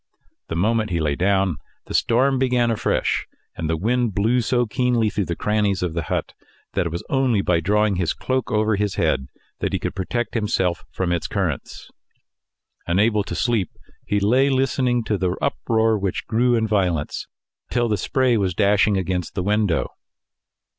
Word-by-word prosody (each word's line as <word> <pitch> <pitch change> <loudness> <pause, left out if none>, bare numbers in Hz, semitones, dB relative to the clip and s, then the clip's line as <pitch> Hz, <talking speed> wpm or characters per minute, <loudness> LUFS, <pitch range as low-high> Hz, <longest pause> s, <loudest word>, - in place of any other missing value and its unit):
The 80 - -4
moment 110 +5 +1
he 85 -2 -1
lay 75 -2 0
down, 95 -2 +1 0.3
the - - -8
storm 130 +3 +2
began 125 -2 +2
afresh, 110 - 0 0.3
and 80 - -3
the 80 - 0
wind 115 +3 0
blew 115 +5 +2
so 120 +1 +1
keenly 120 -2 +1
through 100 - -1
the 85 - -2
crannies 105 -2 0
of 90 -3 -2
the 85 - -1
hut, - - -2 0.4
that 90 -3 0
it - - -5
was 85 - -4
only 130 -7 +1
by 85 -2 +2
drawing 105 +3 +1
his 90 -3 0
cloak 130 0 -2
over 110 0 +2
his 105 -1 -1
head 65 - 0 0.3
that - - -2
he - - +2
could - - -4
protect 115 +6 -3
himself 100 -6 0
from 90 -2 -2
its 85 -2 -1
currents. - - -3 1.0
Unable 105 +4 +2
to 90 - -5
sleep, 115 -4 0 0.3
he 105 - 0
lay 125 +7 +3
listening 130 -2 +1
to 105 -2 -1
the 90 -1 0
uproar 110 -1 +1
which 95 -2 -2
grew 120 +2 +2
in 115 -1 +1
violence, 90 -8 -1 0.4
till 120 -1 +1
the 110 - +1
spray 125 +4 +1
was 95 -4 0
dashing 100 0 +3
against 90 -2 -2
the 90 - -1
window. 100 -6 +1
105 Hz, 175 wpm, -22 LUFS, 90-120 Hz, 1.0 s, lay